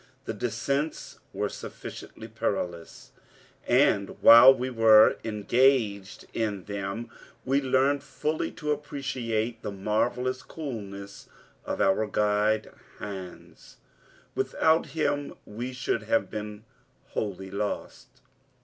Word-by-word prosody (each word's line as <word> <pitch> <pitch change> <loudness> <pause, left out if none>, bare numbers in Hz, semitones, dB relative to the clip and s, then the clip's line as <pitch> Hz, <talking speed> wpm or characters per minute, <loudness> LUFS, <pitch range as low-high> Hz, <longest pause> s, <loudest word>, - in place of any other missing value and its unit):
The - - -3
descents 140 +3 -3
were - - -1
sufficiently - - -9
perilous, 85 -2 -4 0.6
and 100 -1 +2
while 120 +3 +10
we 130 -1 -2
were 110 -2 +6
engaged 110 -2 +1
in 105 -4 -2
them 100 +3 -5 0.3
we 135 +2 +2
learned 135 +1 +2
fully 155 +1 -2
to 150 -3 -3
appreciate 130 -6 -3
the - - -4
marvelous 120 +6 -1
coolness 100 -11 -8 0.4
of - - -3
our 100 +3 +2
guide, 105 +1 +1 0.3
Hans. 95 -3 -9 0.6
Without 160 +1 +2
him 145 -3 -2
we 120 +5 -6
should 125 -3 -2
have 110 +1 0
been 105 0 -6 0.5
wholly 95 -2 -4
lost. 105 +1 -4
110 Hz, 105 wpm, -27 LUFS, 105-130 Hz, 0.6 s, while